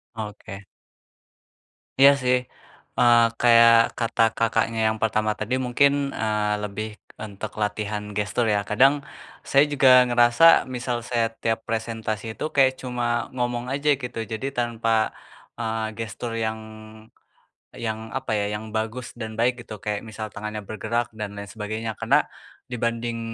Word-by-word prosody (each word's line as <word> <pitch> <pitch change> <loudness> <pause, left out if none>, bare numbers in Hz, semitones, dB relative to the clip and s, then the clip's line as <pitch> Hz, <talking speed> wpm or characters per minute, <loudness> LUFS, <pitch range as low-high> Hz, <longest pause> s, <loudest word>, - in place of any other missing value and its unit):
Oke. 105 -2 -8 1.4
Iya 140 +1 +10
sih, 125 0 +3 0.6
eee, 120 -1 +6 0.2
kayak 115 -1 +7 0.3
kata 115 0 0 0.2
Kakaknya 115 0 0
yang 110 - -2
pertama 110 -1 +1
tadi 110 +4 -1
mungkin, 140 +3 +2
eee, 105 -3 -1
lebih 105 +1 -4 0.3
untuk 105 0 -6
latihan 105 0 -2
gestur 105 +3 0
ya, 105 -1 +2
kadang 130 +6 +5 0.6
saya 140 +1 +6
juga 140 -2 +4 0.2
ngerasa 120 +7 +6
misal 125 -1 -3
saya 115 -2 +1
tiap 115 0 0
presentasi 110 -1 -3
itu - - -5
kayak 130 -2 +5
cuma 120 -2 -2
ngomong 120 0 -2
aja 140 +2 0
gitu, 125 -1 -6
jadi 110 +5 -4
tanpa, 115 -2 0 0.5
eee, 110 -1 -2
gestur 115 +1 -5
yang, 110 -1 -2 1.3
yang 110 0 -4
apa - - -4
ya, 105 -1 0
yang 110 - -9
bagus 110 +3 -3
dan 110 -2 -7
baik 120 +2 +2
gitu, 105 - -9
kayak 105 -1 -2
misal 110 0 -6
tangannya 105 -1 -6
bergerak 115 +3 -3
dan 105 -2 -6
lain 100 - -6
sebagainya. 110 +1 -4
Karena - - +3 0.4
dibanding, 115 -1 -3
115 Hz, 135 wpm, -24 LUFS, 110-120 Hz, 1.4 s, Iya